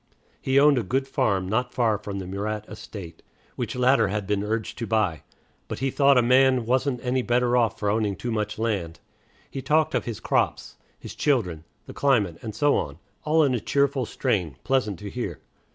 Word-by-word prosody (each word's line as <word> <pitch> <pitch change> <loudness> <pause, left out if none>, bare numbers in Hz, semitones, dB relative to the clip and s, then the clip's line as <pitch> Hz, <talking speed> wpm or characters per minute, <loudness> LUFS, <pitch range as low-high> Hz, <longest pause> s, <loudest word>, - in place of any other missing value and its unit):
He 135 +1 +3
owned 145 -2 +5
a - - -2
good 135 +3 -1
farm 110 -9 0
not 125 +5 -1
far 110 -4 +2
from 100 -1 -6
the 95 - -5
Murat 105 +3 -4
estate, 85 -6 -9 0.3
which - - -4
latter 125 -2 +3
he 100 - -3
had 105 -2 -2
been 100 0 0
urged 110 +3 -3
to 115 - -3
buy; 105 -8 0 0.5
but - - -5
he 135 0 -1
thought 140 -1 +4
a 125 - +5
man 130 0 +4
wasn't 130 +1 +1
any 125 +1 +1
better 120 0 +1
off 115 -4 +2
for 105 - -3
owning 105 -1 +1
too 120 +5 -4
much 105 -1 -2
land. 95 -7 -2 0.5
He 135 - -5
talked 155 +2 +2
of - - 0
his 115 -3 -5
crops, - - -1 0.2
his - - -9
children, 90 - 0 0.2
the - - -10
climate, 110 -12 +1
and 110 -3 -6
so 145 +5 +3
on, 70 0 -4 0.3
all 155 +1 +4
in 135 -3 +2
a 120 - 0
cheerful 140 +1 0
strain, 95 - -1
pleasant 130 -8 0
to 100 +4 -7
hear. 100 -10 -4
115 Hz, 200 wpm, -25 LUFS, 100-130 Hz, 0.5 s, owned